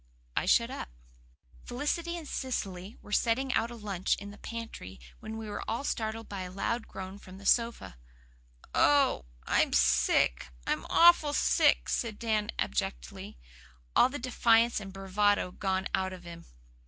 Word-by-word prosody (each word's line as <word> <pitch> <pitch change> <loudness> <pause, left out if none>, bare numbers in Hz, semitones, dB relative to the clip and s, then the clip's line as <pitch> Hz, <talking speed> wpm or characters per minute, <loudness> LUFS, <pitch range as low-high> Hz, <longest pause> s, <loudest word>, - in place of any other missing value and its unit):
I - - 0
shut - - +4
up. - - -6 0.7
Felicity 330 +7 -2
and 320 -3 -8
Cecily 200 -8 -4
were 210 - -13
setting 250 +4 +1
out 225 +1 +1
a 240 - -8
lunch 200 -5 -1
in 200 0 -9
the 205 - -14
pantry 230 - -7 0.2
when 220 0 -7
we 220 -1 -6
were 205 - -5
all 230 +5 -2
startled 225 -3 -3
by 200 -2 -5
a 180 - -5
loud 225 +4 -2
groan 190 +1 -8
from 185 -1 -12
the 200 - -13
sofa. 230 - +1 0.8
"Oh, 280 - +3 0.2
I'm - - +2
sick - - +3 0.2
I'm - - -2
awful 335 -4 +6
sick," - - +3
said 225 -4 -2
Dan 215 -2 0
abjectly, - - -3 0.6
all - - +6
the 285 - -5
defiance 235 -2 +3
and 195 -2 -8
bravado 195 0 +1
gone 190 0 -1
out 190 0 0
of 180 -1 -10
him. 170 -1 -10
210 Hz, 155 wpm, -30 LUFS, 190-235 Hz, 0.8 s, awful